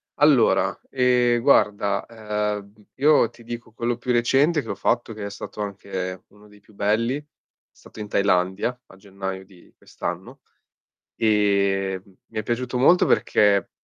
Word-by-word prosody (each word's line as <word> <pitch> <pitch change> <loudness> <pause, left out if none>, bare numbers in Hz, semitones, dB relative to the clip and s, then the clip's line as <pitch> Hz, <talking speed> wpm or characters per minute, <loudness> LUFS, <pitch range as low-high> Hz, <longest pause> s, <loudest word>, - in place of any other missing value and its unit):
allora, 145 -5 +4
ehm, 125 -2 +2
guarda, 105 -6 +2
ehm, 105 -2 -4 0.2
io 145 -4 +4
ti 120 0 -18
dico 120 -1 -8
quello 120 +1 -1
più 125 +1 -3
recente 135 +6 +2
che - - -10
ho - - -1
fatto, 115 +3 -1
che 105 -1 -8
è - - -4
stato 100 +1 -8
anche 95 -2 -5
uno 105 +1 -20
dei 105 0 -19
più 105 - -23
belli, 110 +5 0
è 150 - -18 0.5
stato - - -16
in 105 - -5
Thailandia 100 +4 0
a - - -16
gennaio 95 -1 -7
di 95 -2 -20
quest'anno - - -7 0.8
e 100 -3 +1
m 100 - -22 0.2
mi - - -6
è - - -1
piaciuto 125 +3 -2
molto 170 +8 +5
perché, 100 -2 +2
105 Hz, 155 wpm, -23 LUFS, 100-120 Hz, 0.8 s, molto